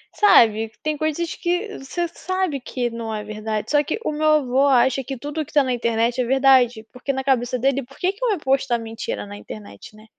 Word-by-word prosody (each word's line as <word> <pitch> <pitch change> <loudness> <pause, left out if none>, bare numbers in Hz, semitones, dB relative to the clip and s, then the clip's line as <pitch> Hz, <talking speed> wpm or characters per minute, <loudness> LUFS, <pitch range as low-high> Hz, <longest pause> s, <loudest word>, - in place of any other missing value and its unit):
sabe, 225 - +5
tem 305 -1 -1
coisas 315 +2 -2
que 360 +5 -2
você 345 +6 -3
sabe 370 -4 -2
que 245 -1 -3
não 230 -1 -5
é 210 -1 -4
verdade, 215 0 -4
só 295 0 +4
que 310 +9 -3
o - - 0
meu 305 +1 -2
avô 280 -3 +3
acha 260 0 +3
que 270 +1 -6
tudo 290 +5 -4
o - - -4
que - - -18
tá 290 -2 +5
na 255 -1 -1
internet 235 +1 0
é - - 0
verdade, 255 -3 +4
porque 250 +2 -3
na 265 0 -3
cabeça 255 -2 +1
dele, 275 +2 +1
por 245 - -17
que 370 +1 +1
que 425 +5 -4
ia 420 -5 +1
postar 265 -3 +1
mentira 225 - -5
na 100 0 -9
internet, 105 - -11
né? 215 0 -16
265 Hz, 225 wpm, -22 LUFS, 230-300 Hz, -, sabe